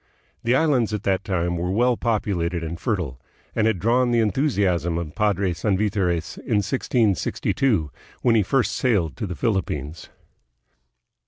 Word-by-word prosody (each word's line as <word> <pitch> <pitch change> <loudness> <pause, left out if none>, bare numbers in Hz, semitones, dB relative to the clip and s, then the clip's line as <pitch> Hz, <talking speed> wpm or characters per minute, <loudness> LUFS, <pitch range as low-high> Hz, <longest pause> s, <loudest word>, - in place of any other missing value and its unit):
The 120 +2 +2
islands 130 -8 +2
at 105 - -5
that 95 0 0
time 85 -4 -1
were 90 +1 -2
well 120 +6 +2
populated 90 -8 -1
and 85 +1 -5
fertile, 85 - -2 0.3
and 110 0 +2
had 110 -4 +1
drawn 120 +6 +2
the 120 - +2
enthusiasm 100 - +1
of 80 -3 -4
Padre 100 -4 +1
Sanvitores 95 -2 -1
in 115 - -2
1662 110 - 0 0.3
when 120 - +4
he 110 - +4
first 125 +5 +1
sailed 100 - +1
to 110 - -3
the 90 - -5
Philippines. 85 - -2
100 Hz, 145 wpm, -23 LUFS, 85-115 Hz, 0.3 s, when